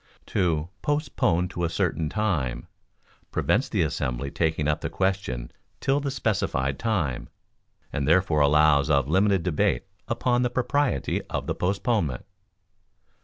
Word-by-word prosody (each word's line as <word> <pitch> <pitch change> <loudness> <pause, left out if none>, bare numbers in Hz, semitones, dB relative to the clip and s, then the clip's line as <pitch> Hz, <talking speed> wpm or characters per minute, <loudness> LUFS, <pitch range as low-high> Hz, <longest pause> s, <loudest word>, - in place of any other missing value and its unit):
To 85 -4 +1
"Postpone 135 - 0
to 90 -2 -4
a 85 - +1
certain 80 -1 -1
time" 75 - -1 0.6
prevents - - +1
the - - +1
assembly 65 +2 -2
taking 80 -2 0
up 75 - 0
the - - -2
question 95 -11 -2 0.3
till 140 +1 +1
the 140 -1 -2
specified 95 - -1
time, 90 - -1 0.6
and 70 - -1
therefore 85 -1 +3
allows 75 0 +4
of 70 -3 +3
limited 95 +2 +3
debate 75 -7 +1 0.2
upon 125 -1 +1
the 125 - +1
propriety 130 - 0
of - - -3
the - - -1
postponement. 95 - -1
85 Hz, 130 wpm, -26 LUFS, 70-105 Hz, 0.6 s, allows